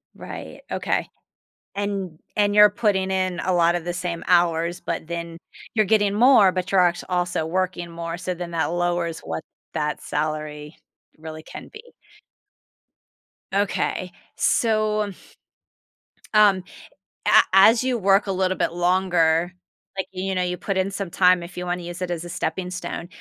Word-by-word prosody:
Right. - - -9
Okay. - - -1 0.7
And- 195 -5 -3 0.2
and 205 0 +2
you're 210 0 +8
putting 200 -3 0
in 185 -2 -1
a 185 - 0
lot 170 0 +3
of 175 - -3
the 175 - -2
same 175 -1 -4
hours, 170 -1 +2
but 160 - -4
then 170 0 -5 0.4
you're 215 -2 +3
getting 205 -1 +2
more, 220 -4 +6
but 185 0 -3
you're 195 - +4
actua 175 0 +1
also 175 -3 0
working 175 0 -2
more, 170 0 -5
so 180 +1 -3
then 175 -1 -6
that 165 -2 0
lowers 175 -1 -1
what 80 - -5 0.3
that 150 -1 -2
salary 150 0 -4 0.4
really 155 0 -9
can - - -10
be. 435 -1 -11 1.7
Okay. 195 -2 -1 0.3
So, 215 -2 +2
um 200 -2 -4 1.2
um, 205 -3 +5 0.6
a - - +8
as 220 +5 +6
you 255 -1 0
work 195 0 +3
a - - 0
little 185 0 0
bit - - 0
longer, 175 -1 +2 0.4
like, 190 -1 -2
you 190 0 -3
know, 185 - +1
you 180 0 -2
put 190 +1 -3
in 190 +1 0
some 195 -2 -4
time 180 0 +4
if 170 +1 -10
you 180 - -4
wanna 175 0 -3
use 175 +1 -7
it 180 -1 -2
as 175 -1 -4
a - - -8
stepping 180 +1 -3
stone, 180 -1 -5
180 Hz, 165 wpm, -23 LUFS, 170-195 Hz, 1.7 s, you're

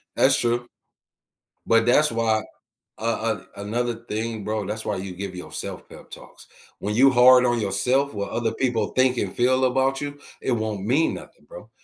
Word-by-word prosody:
That's - - +4
true. 120 0 0 1.0
But 115 0 +3
that's 150 +4 +4
why 115 -1 +1 0.6
uh, - - -16
uh, 115 -1 -1
another 115 +4 -2
thing, 110 -1 -4
bro, 105 0 -2
that's 105 +3 -5
why 105 - -2
you 95 0 -6
give 95 0 -6
yourself 90 - -7
pep - - -14
talks. - - -13 0.3
When 105 - -3
you 135 +4 +6
hard 125 0 +6
on 120 -1 +1
yourself, 125 +8 +1
what 100 -1 -4
other 115 -1 -1
people 120 -5 0
think 130 -1 +2
and 95 -4 -2
feel 130 +2 +2
about 135 +1 +1
you, 145 0 -6 0.2
it - - -1
won't 110 -4 -2
mean 140 +8 +2
nothing, - - -13
bro. - - -12
115 Hz, 180 wpm, -23 LUFS, 105-130 Hz, 1.0 s, you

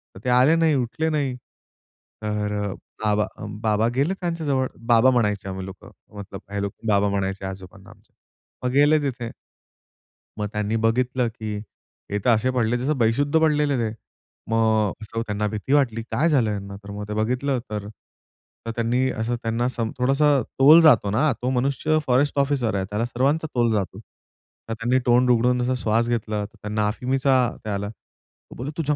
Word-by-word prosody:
तर - - -10
ते 125 - -1
आले 130 +6 +5
नाही, 165 -2 +3
उठले 140 +5 -1
नाही. 140 -4 -1 0.9
तर 105 -1 -2
अ, 100 - -3 0.3
बाबा 105 0 +2
अ, - - -8 0.2
बाबा 110 0 +2
गेले 145 +9 +1
त्यांच्याजवळ 160 -7 -1 0.2
बाबा 120 +2 +5
म्हणायचे 105 -6 0
आम्ही 95 0 -5
लोकं 95 -1 -11 0.3
मतलब 100 -1 -8
हे 100 - -2
लोक 100 - -3 0.2
बाबा 100 -1 +3
म्हणायचे 95 -1 -2
आजोबांना 95 0 -10
आमच्या - - -20 0.5
मग 125 - 0
गेले 145 +3 +5
तिथे 125 -4 -3 1.1
मग 105 - -1
त्यांनी 105 +1 -1
बघितलं, 120 +2 +1
की 110 -2 -5 0.6
हे 105 - 0
तर - - +4
असे 120 +2 +3
पडले 120 0 +1
जसं 140 +4 -1
बेशुद्ध 140 +7 +2
पडलेले 150 -3 +2
ते. 110 -2 -1 0.6
मग 110 -2 +2
असं 115 +1 -4
त्यांना 105 -1 -2
भीती 110 +6 -3
वाटली 125 -6 +2
काय 160 +5 +2
झालं 125 -8 +2
यांना 100 -1 -5
तर 100 - -9
मग 105 0 -6
ते 105 - -4
बघितलं 125 +5 0
तर 105 -1 -4 0.9
त्यांनी 120 +3 +1
असं 115 +2 -2
त्यांना 115 +2 0
सम 115 -3 -2
थोडासं 135 +2 +3 0.2
तोल 155 +5 +8
जातो 120 -10 +5
ना 145 +7 +2
तो 125 - 0
मनुष्य 135 +4 +1
फॉरेस्ट 135 +3 +2
ऑफिसर 135 -6 +1
आहे. 95 -1 -1
त्याला 105 +3 -1
सर्वांचा 140 +7 0
तोल 120 -1 +2
जातो. 100 -1 -2 0.7
तर - - -1
त्यांनी 120 +3 +1
तोंड 125 +1 +4
उघडून 125 +1 +3
जसा 125 +1 0
श्वास 115 +2 +1
घेतला 110 -3 -1
तर 100 - -16
त्यांना 105 0 -1
अफीमीचा 130 +5 0 0.3
त्या 105 -2 -3
आला. 100 +1 -3
तो 110 - -19 0.4
बोलला 135 +5 -5
तुझ्या 150 -2 0
120 Hz, 175 wpm, -23 LUFS, 105-135 Hz, 1.1 s, तोल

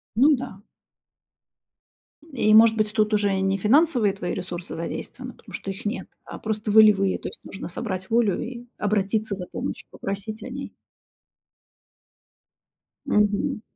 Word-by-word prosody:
Ну 285 +6 +6
да. 245 -7 -7 1.7
И, 215 -5 +3
может 225 0 +7
быть, 215 -1 0
тут 215 0 +2
уже 205 -2 +2
и - - -1
не 195 0 +1
финансовые 240 - +3
твои 180 -3 -4
ресурсы 175 -1 -6
задействованы, 165 - -6
потому - - -16
что 195 - -4
их 195 - -9
нет, 210 +4 -3 0.2
а - - -8
просто 215 0 -2
волевые. 205 -3 +6
То - - -5
есть - - -12
нужно 195 - -7
собрать 190 -1 -5
волю 225 -4 +2
и 240 0 -7
обратиться 210 +1 0
за 180 -2 -6
помощью, - - -5
попросить 210 +2 -5
о 250 - -7
ней. 270 +2 -7 2.3
Мгм. 210 -4 +1
210 Hz, 145 wpm, -24 LUFS, 195-225 Hz, 2.3 s, может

